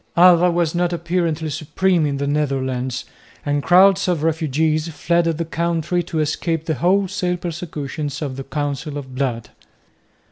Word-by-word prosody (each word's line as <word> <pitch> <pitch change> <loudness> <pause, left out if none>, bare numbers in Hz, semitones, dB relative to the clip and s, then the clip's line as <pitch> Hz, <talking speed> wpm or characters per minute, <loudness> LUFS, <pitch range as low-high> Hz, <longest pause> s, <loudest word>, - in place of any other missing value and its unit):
Alva 180 0 +7
was 170 -2 0
now 175 0 +1
apparently 170 -2 -1
supreme 160 +3 +1
in 140 -1 -2
the 140 - -2
Netherlands; 130 -3 -1 0.4
and 145 0 0
crowds 190 +4 +5
of 170 -4 0
refugees 155 0 0
fled 170 +2 0
the 165 0 -1
country 170 +1 -1
to 170 -1 -5
escape 160 +1 -1
the 160 - 0
wholesale 180 +3 +1
persecutions 155 -4 -5
of 140 -4 -4
the 135 - -6
Council 145 +1 -3
of 130 -2 -8
Blood. 125 -4 -2
160 Hz, 145 wpm, -20 LUFS, 145-175 Hz, 0.4 s, Alva